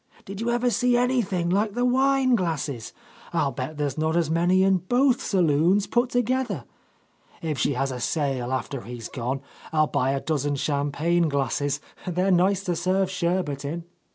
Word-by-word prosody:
Did 195 +2 -7
you 235 - -1
ever 240 +1 +1
see 245 +3 +2
anything 215 -9 +1
like 205 +2 +1
the 245 0 +1
wine 265 +1 +3
glasses 155 - -1 0.4
1 - - +2
I'll 140 - 0
bet 130 +4 -5
there's 145 -1 -2
not 160 +2 +1
as 165 -3 +1
many 175 +3 +3
in 190 0 +4
both 245 +7 +2
saloons 180 +2 +2
put 240 +1 +1
together. 245 - 0 0.8
If 155 -4 -2
she 145 - +1
has 135 +1 -1
a 125 - -5
sale 135 -2 -1
after 130 0 -3
he's 120 -1 -8
gone, 130 +1 -3 0.3
I'll 155 -1 +3
buy 130 -3 0
a 140 - 0
dozen 145 -1 -1
champagne 150 +4 0
glasses; 140 0 -1 0.3
they're 180 +2 +1
nice 190 +2 +3
to 180 -3 -1
serve 185 +2 +1
sherbet 170 -6 -1
In." 165 +4 -4
170 Hz, 175 wpm, -25 LUFS, 140-200 Hz, 0.8 s, in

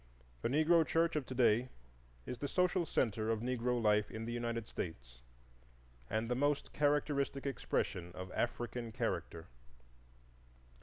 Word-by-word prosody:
The - - 0
Negro 155 +4 +5
church 165 +1 +1
of 150 -4 -1
to 130 - -5
day 120 0 +4 0.6
is 125 - -5
the 145 - -2
social 180 +2 +2
centre 110 -2 0
of 110 -1 0
Negro 125 0 0
life 105 -1 +3
in 110 0 -5
the 120 - -3
United 115 -1 -2
States, 60 -8 -6 0.9
and 110 +2 0
the 125 - +1
most 145 +3 0
characteristic 145 -1 +1
expression 90 -9 -1
of 95 0 -7
African 120 0 -2
character. 85 -6 -3
120 Hz, 140 wpm, -35 LUFS, 110-145 Hz, 0.9 s, Negro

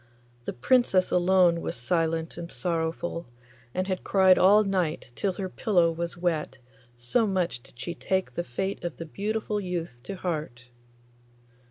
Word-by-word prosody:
The - - -3
Princess 195 - +3
alone 180 -1 +4
was - - -3
silent 165 +5 -1
and 170 0 -7
sorrowful, 170 0 -2 0.4
and 185 +5 -1
had 185 -1 -3
cried 190 -2 +5
all 205 +3 +7
night 180 -9 -1
till 195 -2 0
her 190 +1 -4
pillow 180 -3 +2
was 170 +1 -4
wet, 165 -6 -1 0.4
so 120 - +1
much 180 -10 -1
did 120 - -19
she 170 - -4
take 190 -9 -1
the 175 - -2
fate 190 +9 -3
of 175 -2 -4
the 165 - -6
beautiful 210 +4 -2
youth 170 -9 -4
to 195 - -5
heart. 150 -9 -4
175 Hz, 155 wpm, -27 LUFS, 160-190 Hz, 0.4 s, all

